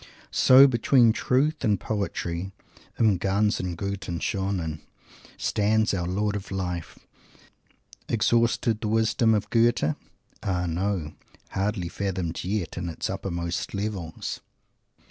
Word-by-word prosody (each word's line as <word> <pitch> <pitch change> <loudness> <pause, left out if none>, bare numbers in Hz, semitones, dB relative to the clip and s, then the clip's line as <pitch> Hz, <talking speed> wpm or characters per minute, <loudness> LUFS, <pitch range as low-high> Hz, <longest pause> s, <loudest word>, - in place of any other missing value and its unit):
So, 130 +2 +8
between 120 -2 +4
Truth 145 +7 +1
and 105 -5 +2
Poetry 95 -3 -3 0.5
"im 105 -6 +3
ganzen 95 -2 0
guten, 100 -2 -4
schonen," 95 -6 -2 0.6
stands 110 +1 +1
our 90 -3 -1
Lord 100 +3 0
of 100 -1 -5
Life! 90 -3 -4 1.1
Exhausted, 115 0 +2
the 110 - -2
wisdom 110 +1 +3
of 105 0 -2
Goethe? 115 -9 +3 0.5
Ah, 90 -2 -1
no! 85 -2 -2 0.4
hardly 95 -2 -1
fathomed 90 -2 -3
yet, 90 -2 -2
in 85 -1 -3
its 80 - -3
uppermost 85 0 -3
levels! 100 -6 -4
100 Hz, 110 wpm, -26 LUFS, 90-110 Hz, 1.1 s, So